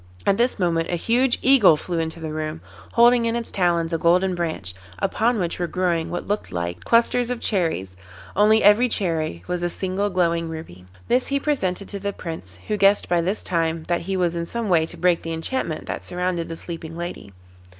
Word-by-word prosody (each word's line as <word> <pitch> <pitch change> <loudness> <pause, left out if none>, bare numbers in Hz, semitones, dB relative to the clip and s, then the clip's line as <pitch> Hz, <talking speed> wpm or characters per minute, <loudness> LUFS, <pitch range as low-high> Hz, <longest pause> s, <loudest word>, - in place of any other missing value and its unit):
At 195 - +3
this 245 +2 +1
moment 170 -4 0
a 175 - 0
huge 240 +7 +2
Eagle 245 - +6
flew 170 +2 -3
into 160 +1 -3
the 160 -1 -5
room, 155 +1 -4 0.3
holding 235 0 +5
in 230 0 0
its 235 -1 -4
talons 170 -3 +1
a 165 - 0
Golden 180 +3 +3
Branch, 160 - -3 0.2
upon 235 +2 +1
which 175 -3 -2
were 175 - 0
growing 175 -2 0
what 175 - -4
looked 205 - -2
like 85 0 -4
clusters 235 +1 +3
of 250 -1 -2
cherries, 160 - -1 0.4
only 215 +2 +4
every 210 +5 +6
cherry 160 - -1
was 180 -1 -3
a 175 - 0
single 190 +3 -2
glowing 170 -3 0
ruby. 160 - -9 0.2
This 250 +1 +2
he 280 0 0
presented 200 -11 -1
to 200 - -4
the 200 +1 -3
Prince, 95 - -8
who 210 - 0
guessed 200 0 +4
by 175 -1 +2
this 190 +5 -2
time 165 -2 -1
that 175 +1 -1
he 190 +2 -2
was 175 -2 +1
in 170 0 -3
some 235 0 -3
way 160 -3 +3
to 175 - -9
break 175 0 +2
the 165 - -4
enchantment 165 0 -3
that - - -5
surrounded 180 -1 -2
the 165 - -6
sleeping 165 -1 -7
lady. 175 - -6
175 Hz, 205 wpm, -23 LUFS, 165-205 Hz, 0.4 s, Eagle